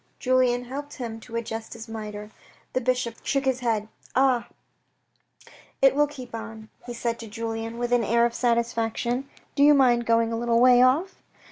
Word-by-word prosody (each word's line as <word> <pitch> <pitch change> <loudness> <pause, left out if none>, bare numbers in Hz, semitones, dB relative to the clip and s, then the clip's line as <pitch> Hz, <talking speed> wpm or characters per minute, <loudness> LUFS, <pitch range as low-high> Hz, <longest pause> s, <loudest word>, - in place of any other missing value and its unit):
Julien 250 -1 +2
helped 285 +3 -7
him 230 -4 -6
to 230 +1 -11
adjust 225 -1 -4
his 230 0 -9
mitre. 210 -1 -7 0.4
The 255 - 0
bishop 250 -2 -1
shook 275 -1 0
his 260 -1 +1
head. 225 -4 -1 0.2
" - - -25
Ah! 260 -2 +3 1.3
it 270 -1 +5
will 295 +1 +3
keep 255 -5 -10
on," 225 -1 -8 0.2
he 240 - -5
said 230 0 -2
to 230 - -8
Julien 225 +1 -5
with 240 0 -1
an 240 -1 +3
air 235 +2 +3
of 235 - -1
satisfaction. 235 +2 -1
" - - -36
Do 280 - +1
you 295 +1 +7
mind 240 -3 +3
going 230 0 +2
a - - -1
little 235 -1 +2
way 250 0 +6
off? 285 +10 +2
235 Hz, 190 wpm, -25 LUFS, 225-255 Hz, 1.3 s, you